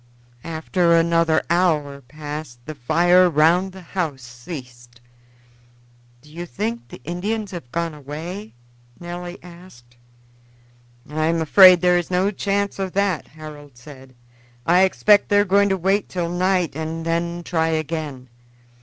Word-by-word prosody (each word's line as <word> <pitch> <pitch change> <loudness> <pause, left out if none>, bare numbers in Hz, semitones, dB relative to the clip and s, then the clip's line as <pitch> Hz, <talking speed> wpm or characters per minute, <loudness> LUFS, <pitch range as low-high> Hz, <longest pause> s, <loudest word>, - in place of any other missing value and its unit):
After 170 +1 +1
another 165 -1 +2
hour 155 -5 +1
passed 150 0 -8
the 155 - -6
fire 175 +7 +3
round 170 +5 +3
the 190 0 -12
house 155 -9 -2
ceased. 120 -1 -11 1.2
"Do 150 - -18
you 175 +2 -6
think 115 -3 -4
the - - -12
Indians 200 - -3
have 165 -10 -9
gone 170 -1 -2
away?" 160 - -8 0.4
Nelly 175 +1 -7
asked. 170 -9 -16 1.1
"I 155 +1 -1
am 165 0 +1
afraid 180 +3 +7
there 180 -1 +4
is 175 - -6
no 185 +2 +1
chance 200 0 -2
of 190 -1 -3
that," 200 -5 0
Harold 150 -3 -12
said. 130 -1 -14 0.5
"I 175 +2 +4
expect 205 +2 +3
they 205 - +3
are 205 - +4
going 200 +1 +3
to 190 - +1
wait 195 +3 0
till 175 -2 -3
night 180 -3 0
and 160 +1 -5
then 170 +1 -2
try 160 -1 0
again. 155 -4 -3
170 Hz, 140 wpm, -21 LUFS, 150-180 Hz, 1.2 s, afraid